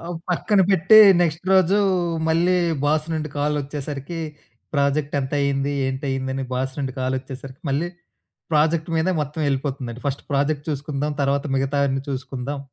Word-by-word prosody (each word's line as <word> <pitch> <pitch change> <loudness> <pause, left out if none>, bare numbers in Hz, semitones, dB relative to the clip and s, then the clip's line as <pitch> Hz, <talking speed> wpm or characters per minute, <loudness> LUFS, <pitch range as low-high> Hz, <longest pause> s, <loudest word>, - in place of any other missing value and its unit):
ఆహ్, 165 - -9
ఒక 170 - -4
పక్కన 195 +3 +2
పెట్టి 195 +4 +6 0.2
నెక్స్ట్ 165 0 0
రోజు 190 +1 +4 0.5
మళ్ళీ 175 +3 +3 0.3
బాస్ 155 +1 +1
నుండి 155 -1 -3
కాలోచ్చేసరికి 145 +1 -3 0.6
ప్రాజెక్ట్ 140 +1 +1
ఎంతయింది? 140 0 0
ఏంటయింది? 130 0 -2
అని 135 - -2
బాస్ 130 +1 -2
నుండి 135 -2 -2
కాలోచ్చేసరికి 130 +1 -4
మళ్ళీ 145 +6 0 0.6
ప్రాజెక్ట్ 160 +2 +2
మీదే 175 +4 +1
మొత్తం 150 +2 -6
ఎళ్ళిపోతుందండి. 130 -3 -3
ఫస్ట్ 140 0 -2
ప్రాజెక్ట్ 145 +1 0
చూసుకుందాం. 145 0 -2
తరువాత 140 0 +1
మిగతావన్నీ 135 0 0
చూసుకుందాం. 135 +1 -4
145 Hz, 130 wpm, -22 LUFS, 135-155 Hz, 0.6 s, పెట్టి